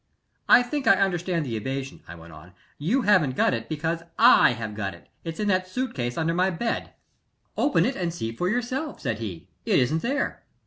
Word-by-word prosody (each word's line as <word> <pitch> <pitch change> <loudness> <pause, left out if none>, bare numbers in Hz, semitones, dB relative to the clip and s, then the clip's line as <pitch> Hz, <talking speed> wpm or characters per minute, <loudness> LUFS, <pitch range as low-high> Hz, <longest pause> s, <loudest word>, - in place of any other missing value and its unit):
"I 245 - +8
think 270 +3 -3
I - - +7
understand 180 -4 0
the 120 -4 -3
evasion," 135 +4 -5
I 85 - -9
went 85 -1 -13
on. 80 +4 -14 0.3
"You 220 - +1
haven't 180 -11 +3
got - - +2
it 115 -1 -4
because 160 +2 -2 0.2
I 235 - +7
have 110 -3 -5
got 100 -4 -4
it 85 - -19 0.2
it's 165 -1 -6
in 210 - -1
that 185 -1 +1
suit 255 +7 -3
case 120 -1 -3
under 165 0 0
my 180 +2 +2
bed." 225 +6 -3 0.6
"Open 290 - +2
it 265 - -1
and 175 -2 -2
see 115 -10 -4
for 180 +8 -1
yourself," 250 +7 -2
said 115 -4 -3
he. 100 -7 -7 0.2
"It - - +2
isn't 155 +6 +1
there." 275 +4 -2
165 Hz, 210 wpm, -25 LUFS, -, 0.6 s, I